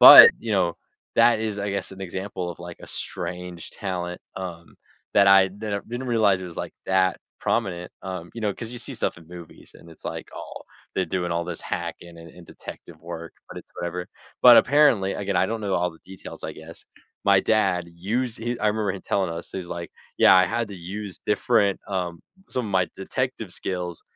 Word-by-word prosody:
but, -, -, +13 dB
you 115 Hz, -, -3 dB
know, 90 Hz, -4 st, +2 dB, 0.4 s
that 115 Hz, -2 st, +6 dB
is, 110 Hz, -2 st, -2 dB
I 100 Hz, 0 st, -2 dB
guess, 100 Hz, 0 st, -2 dB
an 95 Hz, -, -11 dB
example 95 Hz, 0 st, -4 dB
of, 85 Hz, -, -9 dB
like, 85 Hz, -1 st, -8 dB
a -, -, -10 dB
strange 90 Hz, -1 st, -5 dB
talent, 90 Hz, -3 st, -4 dB, 0.2 s
um, 85 Hz, -3 st, -7 dB, 0.4 s
that 100 Hz, -1 st, +6 dB
I 95 Hz, 0 st, +7 dB
didn't 100 Hz, +1 st, -5 dB
didn't 120 Hz, +3 st, -4 dB
realize 105 Hz, -5 st, +3 dB
it -, -, -6 dB
was, 85 Hz, -, -10 dB
like, -, -, -4 dB
that 95 Hz, -1 st, +2 dB, 0.2 s
prominent, 90 Hz, -6 st, -1 dB
um, 90 Hz, -2 st, -6 dB
you 115 Hz, -, -6 dB
know, 105 Hz, -2 st, 0 dB
'cause 115 Hz, -, -6 dB
you 120 Hz, -, -5 dB
see -, -, -4 dB
stuff -, -, -2 dB
in 85 Hz, -, -16 dB
movies, 85 Hz, -2 st, -12 dB
and 85 Hz, -, -15 dB
it's 80 Hz, -, -17 dB
like, -, -, -5 dB
"Oh, -, -, -8 dB, 0.3 s
they're -, -, +1 dB
doing 90 Hz, -2 st, -2 dB
all 85 Hz, 0 st, 0 dB
this 85 Hz, -1 st, -5 dB
hacking 85 Hz, -1 st, -5 dB
and 85 Hz, 0 st, -11 dB
and 90 Hz, -1 st, -13 dB
detective -, -, -11 dB
work, -, -, -7 dB, 0.2 s
but -, -, -7 dB
it's -, -, -13 dB
whatever," 90 Hz, +1 st, -3 dB, 0.4 s
but, 120 Hz, -1 st, +10 dB
apparently, 125 Hz, -9 st, +4 dB
again, 100 Hz, -2 st, -2 dB
I -, -, +4 dB
don't 115 Hz, +2 st, -3 dB
know 100 Hz, -2 st, -1 dB
all 90 Hz, 0 st, +1 dB
the 80 Hz, -, -18 dB
details, 95 Hz, 0 st, -10 dB
I -, -, -3 dB
guess. 80 Hz, +1 st, -11 dB, 0.4 s
My 100 Hz, -1 st, +6 dB
dad 95 Hz, -5 st, +2 dB
used 110 Hz, +7 st, -1 dB
he 120 Hz, +2 st, -3 dB
I -, -, +2 dB
remember 105 Hz, -2 st, 0 dB
him 95 Hz, -, -7 dB
telling 95 Hz, -3 st, 0 dB
us, 85 Hz, +1 st, -6 dB
he's 90 Hz, -2 st, -5 dB
like, 85 Hz, -1 st, -5 dB, 0.3 s
"Yeah, -, -, +8 dB
I 95 Hz, -, +7 dB
had 115 Hz, +4 st, -1 dB
to 100 Hz, -, -7 dB
use 95 Hz, +2 st, -6 dB
different" 100 Hz, -2 st, +2 dB
um, 90 Hz, -4 st, -2 dB, 0.3 s
"some 125 Hz, -3 st, -2 dB
of -, -, -5 dB
my 90 Hz, -1 st, +3 dB
detective 125 Hz, +1 st, -3 dB
skills 90 Hz, -2 st, -4 dB
95 Hz, 210 wpm, -25 LUFS, 90-105 Hz, 0.4 s, but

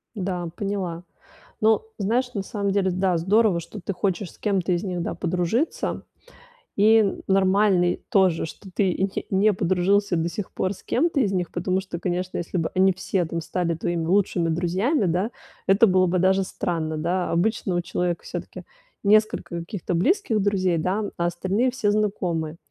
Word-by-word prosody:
Да, 180 Hz, -3 st, -3 dB
поняла. 190 Hz, -4 st, -3 dB, 0.6 s
Ну, 220 Hz, 0 st, +4 dB, 0.2 s
знаешь, 240 Hz, +5 st, 0 dB
на 200 Hz, -, -1 dB
самом 200 Hz, -2 st, -2 dB
деле, 190 Hz, -1 st, +1 dB
да, 185 Hz, 0 st, +1 dB
здорово, 195 Hz, +2 st, +3 dB
что 195 Hz, +5 st, -9 dB
ты 185 Hz, +3 st, -3 dB
хочешь 190 Hz, -1 st, -2 dB
с -, -, -21 dB
кем-то 195 Hz, -3 st, 0 dB
из 175 Hz, +3 st, 0 dB
них, 180 Hz, -3 st, -2 dB
да, -, -, -3 dB
подружиться. 180 Hz, -, -1 dB, 0.7 s
И 215 Hz, 0 st, +4 dB
нормальный 190 Hz, -2 st, +3 dB
тоже, 185 Hz, -5 st, +3 dB
что 190 Hz, +4 st, -11 dB
ты 190 Hz, -4 st, +2 dB
не 190 Hz, +1 st, -2 dB
не 205 Hz, +2 st, +4 dB
подружился 190 Hz, +1 st, +1 dB
до 165 Hz, +1 st, 0 dB
сих 190 Hz, +3 st, -5 dB
пор 185 Hz, -, -1 dB
с 195 Hz, -, -13 dB
кем-то 300 Hz, +1 st, +1 dB
из 205 Hz, -6 st, +2 dB
них, 180 Hz, -2 st, -2 dB
потому 185 Hz, +2 st, 0 dB
что, 185 Hz, -2 st, -6 dB
конечно, 180 Hz, +1 st, -2 dB
если 175 Hz, +2 st, -4 dB
бы 165 Hz, -2 st, 0 dB
они 190 Hz, +1 st, +4 dB
все 185 Hz, 0 st, -1 dB
там 165 Hz, +1 st, -4 dB
стали 170 Hz, 0 st, -1 dB
твоими 165 Hz, 0 st, -2 dB
лучшими 180 Hz, -2 st, +2 dB
друзьями, 185 Hz, -, +1 dB
да, 185 Hz, +6 st, 0 dB, 0.4 s
это 195 Hz, +4 st, +5 dB
было 185 Hz, -1 st, +4 dB
бы 180 Hz, +1 st, +1 dB
даже 190 Hz, +1 st, +3 dB
странно, 160 Hz, -4 st, -3 dB
да. 175 Hz, +3 st, -1 dB
Обычно 190 Hz, +1 st, 0 dB
у 175 Hz, -, +2 dB
человека 175 Hz, 0 st, -2 dB
всё-таки -, -, -7 dB, 0.4 s
несколько 210 Hz, -4 st, +2 dB
каких-то 175 Hz, +1 st, -4 dB
близких 225 Hz, -, +2 dB
друзей, 185 Hz, -4 st, +1 dB
да, 190 Hz, +6 st, -1 dB
а 170 Hz, -, +1 dB
остальные 190 Hz, +8 st, 0 dB
все- 215 Hz, -5 st, 0 dB
знакомые. 180 Hz, -7 st, -1 dB
185 Hz, 170 wpm, -24 LUFS, 175-205 Hz, 0.7 s, это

